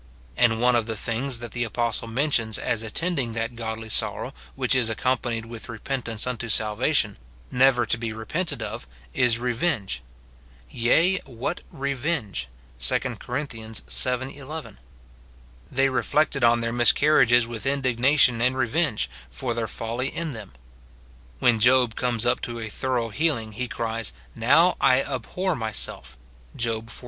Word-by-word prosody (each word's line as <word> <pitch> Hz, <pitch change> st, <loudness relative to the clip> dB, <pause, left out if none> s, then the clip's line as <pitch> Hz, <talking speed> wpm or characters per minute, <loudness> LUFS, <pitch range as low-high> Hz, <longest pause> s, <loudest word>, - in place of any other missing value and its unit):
And 115 Hz, -2 st, +3 dB
one 125 Hz, +1 st, +4 dB
of 115 Hz, -1 st, +1 dB
the 110 Hz, -, -2 dB
things 120 Hz, +4 st, -1 dB
that 120 Hz, -1 st, -8 dB
the 120 Hz, -, -1 dB
apostle 115 Hz, 0 st, -1 dB
men 140 Hz, +7 st, 0 dB
tions 110 Hz, -4 st, +1 dB
as 115 Hz, -, -1 dB
attending 130 Hz, +2 st, -1 dB
that 115 Hz, +1 st, -3 dB
godly 110 Hz, -1 st, -5 dB
sorrow -, -, 0 dB, 0.2 s
which 130 Hz, -1 st, +1 dB
is 125 Hz, -3 st, +2 dB
accompa 125 Hz, +2 st, 0 dB
nied 110 Hz, -, -9 dB
Avith 115 Hz, -1 st, -9 dB
repentance 115 Hz, -1 st, -3 dB
unto 125 Hz, -2 st, -4 dB
salvation, 110 Hz, +2 st, +1 dB, 0.3 s
never 125 Hz, -1 st, +4 dB
to 115 Hz, +1 st, -1 dB
be 115 Hz, -1 st, -3 dB
repented 155 Hz, +11 st, -3 dB
of, -, -, -6 dB, 0.3 s
is 125 Hz, -3 st, +3 dB
revenge: 120 Hz, -, -1 dB, 0.7 s
"Yea, 165 Hz, +11 st, +3 dB
what 120 Hz, -1 st, -4 dB
revenge!" 135 Hz, -, -2 dB, 0.3 s
2 -, -, +2 dB, 0.2 s
Cor. 140 Hz, +5 st, -3 dB
vii. 125 Hz, +3 st, -1 dB
11. 145 Hz, -, -8 dB, 0.9 s
They 135 Hz, +1 st, +3 dB
reflected 135 Hz, +1 st, +1 dB
on 120 Hz, 0 st, +5 dB
their 115 Hz, 0 st, -1 dB
miscarriages 120 Hz, 0 st, +5 dB
with 120 Hz, +2 st, -5 dB
indignation 130 Hz, -2 st, +3 dB
and 125 Hz, +2 st, +2 dB
revenge, 130 Hz, 0 st, +1 dB, 0.2 s
for 120 Hz, -, -3 dB
their 115 Hz, -1 st, -2 dB
folly 115 Hz, +4 st, -2 dB
in 165 Hz, +2 st, -3 dB
them. 110 Hz, -, -9 dB, 0.8 s
When 115 Hz, -, +3 dB
Job 125 Hz, 0 st, +5 dB
comes 120 Hz, -2 st, 0 dB
up 120 Hz, -, +2 dB
to 120 Hz, -1 st, -5 dB
a 110 Hz, -1 st, -5 dB
thorough 125 Hz, 0 st, -1 dB
healing, 115 Hz, -3 st, 0 dB
he 125 Hz, +4 st, -4 dB
cries, 115 Hz, -, -3 dB
" -, -, -27 dB
Now 155 Hz, +10 st, +4 dB
I 130 Hz, +1 st, +5 dB
abhor 165 Hz, +8 st, -2 dB
my 110 Hz, -2 st, -3 dB
self," 65 Hz, -, -2 dB, 0.4 s
Job 115 Hz, -1 st, -2 dB
xlii. -, -, -9 dB
120 Hz, 155 wpm, -25 LUFS, 115-130 Hz, 0.9 s, on